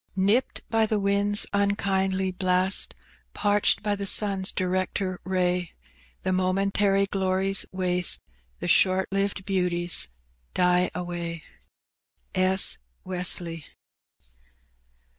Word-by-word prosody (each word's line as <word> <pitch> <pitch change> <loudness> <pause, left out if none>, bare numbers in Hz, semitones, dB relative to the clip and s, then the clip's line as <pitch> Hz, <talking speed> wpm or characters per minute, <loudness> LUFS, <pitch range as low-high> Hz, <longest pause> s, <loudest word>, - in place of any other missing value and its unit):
Nipt 200 +7 0
by 225 -1 +2
the 215 -1 0
winds' 200 +1 +2
nnkindly 190 -2 0
blast, 185 +1 +1 0.4
Parched 205 0 +2
by 210 -1 0
the 200 0 -4
sun's 195 -2 +2
director 185 0 -2
ray, 180 -1 -1 0.5
The 185 - 0
momentary 195 +2 +1
glories 190 0 +1
waste, 180 -1 +1 0.4
The - - -4
short 190 0 +3
lived 195 -1 -1
beauties 175 - +1 0.5
die 180 0 +2
away. 170 -2 -5 0.9
S. 190 0 +3 0.2
Wesley. 175 -3 -1
190 Hz, 95 wpm, -25 LUFS, 180-200 Hz, 0.9 s, short